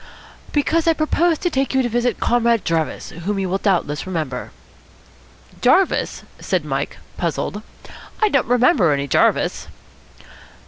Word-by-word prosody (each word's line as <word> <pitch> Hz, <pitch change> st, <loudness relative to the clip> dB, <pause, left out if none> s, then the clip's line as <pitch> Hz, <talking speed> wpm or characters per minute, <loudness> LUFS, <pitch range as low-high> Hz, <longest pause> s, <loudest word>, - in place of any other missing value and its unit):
"Because 320 Hz, +3 st, +1 dB
I 330 Hz, -, +5 dB
propose 320 Hz, +2 st, +1 dB
to 355 Hz, -, -2 dB
take 270 Hz, -1 st, -1 dB
you 265 Hz, -, +3 dB
to -, -, 0 dB
visit 240 Hz, +1 st, 0 dB
Comrade 235 Hz, -2 st, +2 dB
Jarvis, 165 Hz, -2 st, -2 dB
whom 185 Hz, +5 st, -4 dB
you 195 Hz, -1 st, -1 dB
will 190 Hz, +2 st, -1 dB
doubtless 180 Hz, -6 st, 0 dB
remember." 160 Hz, -8 st, -4 dB, 1.1 s
"Jarvis?" 385 Hz, -1 st, +2 dB, 0.2 s
said -, -, -1 dB
Mike, -, -, -3 dB, 0.2 s
puzzled. 210 Hz, -, -2 dB, 0.6 s
"I 430 Hz, -, +3 dB
don't 275 Hz, -8 st, +1 dB
remember 240 Hz, -, +4 dB
any 140 Hz, 0 st, -2 dB
Jarvis." -, -, +1 dB
235 Hz, 135 wpm, -20 LUFS, 180-295 Hz, 1.1 s, I